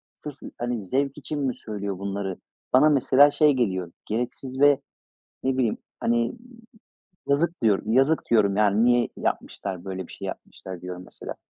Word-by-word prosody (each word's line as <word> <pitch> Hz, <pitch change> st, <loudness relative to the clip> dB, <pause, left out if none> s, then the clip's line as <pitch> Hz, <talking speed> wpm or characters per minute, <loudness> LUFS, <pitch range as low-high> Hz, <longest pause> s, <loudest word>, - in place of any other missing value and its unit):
sırf, 145 Hz, -2 st, -9 dB, 0.2 s
hani, 120 Hz, -2 st, -2 dB
zevk 135 Hz, +9 st, -1 dB
için 150 Hz, +1 st, -4 dB
mi 135 Hz, -3 st, -1 dB
söylüyor 100 Hz, -3 st, -5 dB
bunları?" 100 Hz, -1 st, -3 dB, 0.4 s
Bana 150 Hz, +4 st, +7 dB
mesela 140 Hz, 0 st, +5 dB
şey 150 Hz, 0 st, +4 dB
geliyor. 95 Hz, -9 st, -1 dB
Gereksiz 125 Hz, +4 st, -4 dB
ve 145 Hz, -1 st, +6 dB, 0.6 s
ne 130 Hz, 0 st, 0 dB
bileyim, 120 Hz, -5 st, +1 dB, 0.2 s
hani, 120 Hz, +1 st, +1 dB, 0.9 s
yazık, 155 Hz, +1 st, +1 dB
diyorum. 110 Hz, 0 st, +2 dB
"Yazık." 135 Hz, +6 st, +3 dB
diyorum, 100 Hz, -4 st, +4 dB
yani. 105 Hz, +1 st, +3 dB
"Niye 120 Hz, -1 st, +4 dB
yapmışlar? 90 Hz, -2 st, -3 dB
Böyle 95 Hz, -1 st, -5 dB
bir -, -, -13 dB
şey -, -, -7 dB
yapmışlar." 95 Hz, -2 st, -8 dB
diyorum 90 Hz, 0 st, -7 dB
mesela. -, -, -8 dB
120 Hz, 150 wpm, -25 LUFS, 100-135 Hz, 0.9 s, Bana